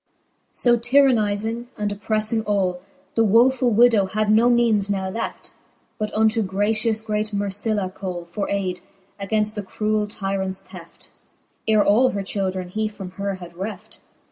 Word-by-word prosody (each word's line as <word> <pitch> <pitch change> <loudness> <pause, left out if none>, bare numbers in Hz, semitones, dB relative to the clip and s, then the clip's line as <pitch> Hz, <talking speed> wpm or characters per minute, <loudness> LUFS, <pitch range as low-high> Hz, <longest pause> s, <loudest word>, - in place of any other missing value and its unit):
So 240 -1 +3
tyrannizing, 235 -3 +2
and 210 -1 -2
opprefling 215 +2 0
all, 185 -3 0 0.3
The 225 - +3
woefull 245 +4 +4
widow 225 -3 +5
had 215 +2 0
no 225 +3 +5
meanes 230 -4 +3
now 190 -2 -1
left, 225 +4 -5 0.5
But 215 0 -2
unto 220 +1 +3
gratious 215 +3 0
great 215 -1 -2
Mercilla 205 0 -1
call 185 -2 -6
For 185 +4 -4
ayde, 185 -3 -2 0.4
againft 210 +1 +1
that 205 -3 -6
cruell 215 0 -1
tyrants 195 -2 -3
theft, - - -12 0.6
Ere 215 -2 +4
all 240 +6 +4
her 200 -1 -2
children 190 -2 -3
he 215 +3 -1
from 200 -3 -8
her 200 +1 -3
had 175 -2 -11
reft. 205 +3 -7
210 Hz, 145 wpm, -22 LUFS, 195-220 Hz, 0.6 s, widow